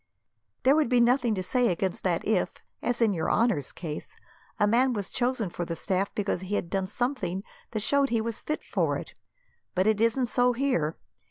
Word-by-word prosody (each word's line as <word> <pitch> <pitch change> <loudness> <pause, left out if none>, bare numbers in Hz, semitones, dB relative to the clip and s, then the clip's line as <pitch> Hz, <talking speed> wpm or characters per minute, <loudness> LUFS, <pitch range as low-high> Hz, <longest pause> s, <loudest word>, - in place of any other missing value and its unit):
There 270 +2 +6
would 305 -6 +2
be 250 - +4
nothing 240 -1 +3
to 185 - -2
say 245 +6 +2
against 185 0 -1
that - - 0
if, - - +2 0.3
as 245 -1 +1
in 215 -3 +3
your 160 -3 -1
honour's 215 - +1
case, 155 -4 -7 0.4
a 210 - +5
man 245 +5 +3
was 200 -4 -4
chosen 245 -6 0
for 175 - -3
the 170 0 -4
staff 190 +3 -1
because 200 -3 -1
he 190 +2 -3
had 170 - -2
done 195 -1 0
something 215 -4 -2 0.3
that 215 - -3
showed 280 +5 +3
that 240 - -4
he 230 - +3
was 225 0 -4
fit 305 - -3
for - - 0
it. - - -8 0.6
But 185 +1 +2
it 215 0 +2
isn't 230 +3 +3
so 245 +1 +2
here. 235 - 0
220 Hz, 205 wpm, -28 LUFS, 190-245 Hz, 0.6 s, There